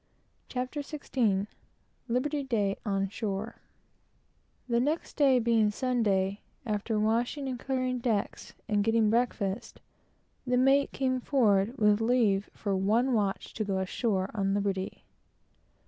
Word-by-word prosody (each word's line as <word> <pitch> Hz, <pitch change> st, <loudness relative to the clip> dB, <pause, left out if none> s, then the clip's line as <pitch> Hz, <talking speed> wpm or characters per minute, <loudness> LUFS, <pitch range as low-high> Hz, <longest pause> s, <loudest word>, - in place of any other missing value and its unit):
CHAPTER 255 Hz, +3 st, -3 dB
XVI 250 Hz, -9 st, -1 dB, 0.6 s
LIBERTY 280 Hz, +5 st, 0 dB
DAY 205 Hz, -6 st, 0 dB
ON 195 Hz, -1 st, 0 dB
SHORE 205 Hz, +1 st, -4 dB, 1.1 s
The 235 Hz, -1 st, +2 dB
next 300 Hz, +6 st, -1 dB
day 275 Hz, -4 st, +4 dB
being 230 Hz, -3 st, +3 dB
Sunday, 210 Hz, -5 st, 0 dB, 0.2 s
after 215 Hz, 0 st, -1 dB
washing 235 Hz, +6 st, 0 dB
and 255 Hz, -2 st, -4 dB
clearing 255 Hz, -1 st, -1 dB
decks, 225 Hz, -4 st, -2 dB
and 210 Hz, -1 st, +1 dB
getting 225 Hz, -1 st, +3 dB
breakfast, 230 Hz, -3 st, -1 dB, 0.7 s
the 250 Hz, 0 st, +2 dB
mate 270 Hz, +2 st, +4 dB
came 255 Hz, -1 st, 0 dB
forward 230 Hz, -3 st, +2 dB
with 210 Hz, -2 st, +3 dB
leave 225 Hz, -4 st, +2 dB
for 200 Hz, -2 st, -2 dB
one 220 Hz, +7 st, +2 dB
watch 205 Hz, -4 st, -1 dB
to 220 Hz, -, -2 dB
go 195 Hz, -2 st, -1 dB
ashore, 190 Hz, 0 st, -1 dB
on 195 Hz, -2 st, 0 dB
liberty. 195 Hz, -2 st, -2 dB
225 Hz, 125 wpm, -29 LUFS, 200-255 Hz, 1.1 s, day